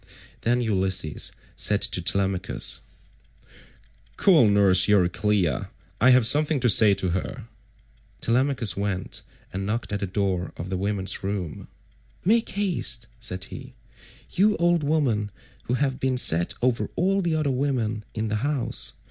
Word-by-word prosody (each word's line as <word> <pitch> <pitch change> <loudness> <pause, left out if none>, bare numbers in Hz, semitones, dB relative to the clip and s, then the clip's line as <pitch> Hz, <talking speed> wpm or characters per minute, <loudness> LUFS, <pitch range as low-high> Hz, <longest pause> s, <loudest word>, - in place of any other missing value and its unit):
Then 120 +2 +1
Ulysses 95 -7 -1 0.2
said 105 -1 +2
to 90 - 0
Telemachus, 95 +1 0 1.4
"Call 165 - +5
nurse 100 -2 +5
Euryclea; 100 -1 +1 0.3
I 125 - +6
have 130 -2 +5
something 150 +4 +3
to 125 - +2
say 105 -1 +7
to 95 -1 -2
her." 90 +2 -4 0.7
Telemachus 120 -4 +1
went 100 -2 -4 0.3
and 95 +1 -4
knocked 105 +2 -3
at 100 - -2
the 100 - -3
door 95 -2 -2
of 90 +3 -7
the 95 - -1
women's 100 0 -2
room. 95 -5 -5 0.6
"Make 225 +4 +2
haste," 175 - -1
said 95 -5 -4
he, - - -11 0.6
"you 210 +3 +2
old 175 -2 +1
woman 135 -9 0 0.4
who 125 - -1
have 135 -1 -1
been 130 -1 -1
set 85 -8 +3
over 125 -2 0
all 195 +3 +1
the 170 -3 -1
other 155 -3 0
women 125 -5 -2
in 110 0 -2
the 105 - -1
house. 130 -1 -2
110 Hz, 140 wpm, -24 LUFS, 95-135 Hz, 1.4 s, say